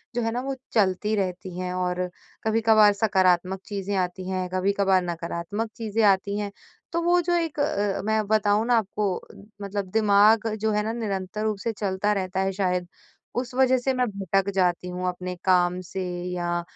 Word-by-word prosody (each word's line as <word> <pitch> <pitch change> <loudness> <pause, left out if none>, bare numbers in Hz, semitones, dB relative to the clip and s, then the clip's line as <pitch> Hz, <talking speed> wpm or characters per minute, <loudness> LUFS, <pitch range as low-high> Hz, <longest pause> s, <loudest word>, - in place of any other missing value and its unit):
जो 240 - +1
है 225 0 0
ना, 245 +2 -2
वो 270 +1 -3 0.2
चलती 210 0 +2
रहती 185 -2 -3
हैं। 180 0 -3
और 180 0 -1 0.3
कभी-कभार 220 -1 +5
सकारात्मक 190 -3 +2
चीज़ें 200 -1 -3
आती 185 0 -2
हैं, 185 -1 -1
कभी-कभार 195 0 +2
नकारात्मक 170 +6 -3
चीज़ें 225 -1 -1
आती 200 0 +3
हैं। 205 -1 -3 0.4
तो 340 - +1
वो 350 +1 +3
जो 350 +1 0
एक 330 -3 -1
अ, 205 -9 0
मैं 220 0 +1
बताऊँ 215 0 +2
ना 245 -1 +4
आपको 205 -2 -1
अ, - - -14 0.3
मतलब 200 0 -3
दिमाग 215 +1 +4
जो 220 0 -1
है 210 0 +1
ना, 220 +1 -2
निरंतर 205 -3 -3
रूप 215 -1 0
से 230 - 0
चलता 200 0 0
रहता 190 -1 -2
है, 190 0 +1
शायद 180 -2 -1 0.5
उस 245 0 -2
वज़ह 260 0 +4
से 260 +2 0
मैं 255 -1 +1
भटक 195 -1 0
जाती 180 -2 +1
हूँ 180 +1 -3
अपने 180 0 -4
काम 180 -1 +3
से। 190 +1 -4 0.3
या 175 -1 -1
200 Hz, 185 wpm, -25 LUFS, 185-220 Hz, 0.5 s, कभी-कभार